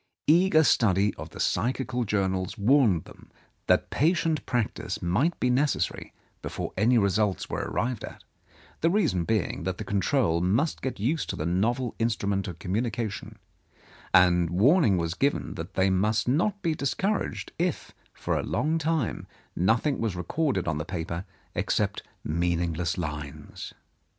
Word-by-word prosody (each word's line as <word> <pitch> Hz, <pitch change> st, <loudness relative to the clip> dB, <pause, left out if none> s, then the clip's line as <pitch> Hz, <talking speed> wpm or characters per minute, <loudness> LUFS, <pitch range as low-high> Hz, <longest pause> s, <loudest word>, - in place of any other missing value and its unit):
Eager 165 Hz, 0 st, +5 dB
study 100 Hz, -, +3 dB
of -, -, -8 dB
the -, -, -12 dB
psychical 125 Hz, +4 st, 0 dB
journals 95 Hz, -3 st, -1 dB
warned 110 Hz, -, +4 dB
them -, -, -16 dB, 0.4 s
that -, -, +2 dB
patient 160 Hz, 0 st, +1 dB
practice 120 Hz, -4 st, -2 dB
might 120 Hz, -, 0 dB
be -, -, +1 dB
necessary 140 Hz, +4 st, 0 dB, 0.3 s
before -, -, -5 dB
any 120 Hz, +5 st, +3 dB
results 100 Hz, -1 st, +1 dB
were -, -, -2 dB
arrived 115 Hz, +2 st, -2 dB
at, -, -, -9 dB, 0.6 s
the 165 Hz, -, +3 dB
reason 165 Hz, -, +1 dB
being 110 Hz, -2 st, -1 dB
that 90 Hz, +1 st, -3 dB
the -, -, -5 dB
control 100 Hz, -, +1 dB
must 115 Hz, -, +1 dB
get 130 Hz, -5 st, -4 dB
used 140 Hz, +10 st, -1 dB
to -, -, -2 dB
the 75 Hz, -, -3 dB
novel 115 Hz, +8 st, 0 dB
instrument 100 Hz, -4 st, 0 dB
of 90 Hz, -3 st, -6 dB
communication; 110 Hz, +4 st, -3 dB, 0.7 s
and 90 Hz, -2 st, +5 dB
warning 110 Hz, -, +4 dB
was 85 Hz, -1 st, -1 dB
given 140 Hz, +10 st, 0 dB
that 85 Hz, +1 st, -7 dB
they 95 Hz, 0 st, +3 dB
must 105 Hz, +5 st, +1 dB
not 175 Hz, +10 st, +1 dB
be 165 Hz, -3 st, +1 dB
discouraged 190 Hz, +9 st, -2 dB
if 175 Hz, -3 st, -1 dB, 0.2 s
for -, -, -2 dB
a -, -, 0 dB
long 160 Hz, +2 st, 0 dB
time 160 Hz, -5 st, -1 dB, 0.3 s
nothing 115 Hz, -, +2 dB
was 110 Hz, -5 st, -1 dB
recorded 95 Hz, -, -1 dB
on 75 Hz, -1 st, 0 dB
the -, -, -2 dB
paper 85 Hz, +1 st, -4 dB, 0.3 s
except -, -, 0 dB, 0.2 s
meaningless 85 Hz, +1 st, -1 dB
lines. 75 Hz, -4 st, -6 dB
105 Hz, 145 wpm, -27 LUFS, 90-140 Hz, 0.7 s, Eager